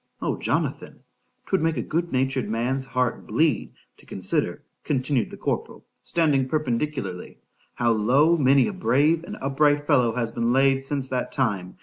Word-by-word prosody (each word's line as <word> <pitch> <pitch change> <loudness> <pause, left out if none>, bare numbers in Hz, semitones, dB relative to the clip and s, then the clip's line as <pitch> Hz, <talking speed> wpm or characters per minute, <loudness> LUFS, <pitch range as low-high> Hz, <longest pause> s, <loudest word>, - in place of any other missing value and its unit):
—O - - -1
Jonathan! - - -3 0.4
'twould 190 - 0
make 160 -1 0
a - - -1
good 170 +2 -2
natured 130 0 0
man's 125 +4 -1
heart 125 -2 -2
bleed, 130 +1 +1 0.2
to - - -20
consider, - - -2 0.2
continued 135 -3 0
the - - -10
corporal - - -4 0.2
(standing 145 -6 +1
perpendicularly), 130 - -3 0.4
how 120 -1 +2
low 130 +10 +3
many 135 -3 +4
a 210 - -3
brave 160 -2 +2
and 210 +5 -8
upright 145 +1 +2
fellow 125 -7 +3
has 115 -2 -1
been 115 0 0
laid 135 +1 +3
since 135 -1 -3
that 125 -1 -2
time! 100 -10 -2
135 Hz, 155 wpm, -24 LUFS, 120-150 Hz, 0.4 s, many